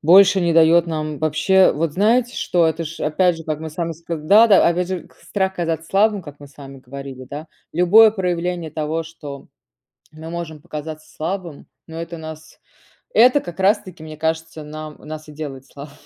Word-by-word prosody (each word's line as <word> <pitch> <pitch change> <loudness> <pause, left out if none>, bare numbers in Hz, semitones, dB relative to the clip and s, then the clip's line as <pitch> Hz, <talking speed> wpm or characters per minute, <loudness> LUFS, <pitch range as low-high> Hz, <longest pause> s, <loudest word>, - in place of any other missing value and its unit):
больше 190 +4 +6
не 170 -1 +1
даёт 165 +1 +5
нам 155 -2 -3
Вообще, 155 +5 +3
вот 155 +1 -1
знаете, 230 +5 +2
что? 175 -2 +2
Это 160 +1 -1
ж 160 +2 -8
опять 170 +3 +2
же, 165 - -10
как 155 -1 -3
мы 160 - -5
с - - -16
вами 170 -1 -2
ска 165 +1 -6
да-да, 200 +6 +6
опять 175 +1 0
же, 185 -2 -5
к - - -25
страх 190 -2 -2
казаться 165 -2 -2
слабым, 205 0 +2
как 145 -2 -11
мы 145 - -10
с 140 - -24
вами 135 -1 -10
говорили, 130 0 -9
да. 150 +3 -7 0.2
Любое 205 +6 +6
проявление 175 -4 -2
того, 155 +1 -2
что 150 -4 -10 0.6
мы 160 +1 -9
можем 160 -3 -6
показаться 155 -1 -8
слабым, 170 -2 -5 0.2
но 160 - -9
это 170 0 -6
нас 155 0 -10 0.5
это 255 +4 +5
как 175 -3 -9
раз 200 +3 +4
таки, 185 -5 -12
мне 155 -1 -9
кажется, 160 0 -3
нам 155 0 -8
нас 155 0 -9
и 150 - -11
делает 140 -3 -7
слабы 140 +1 -11
160 Hz, 195 wpm, -20 LUFS, 155-180 Hz, 0.6 s, больше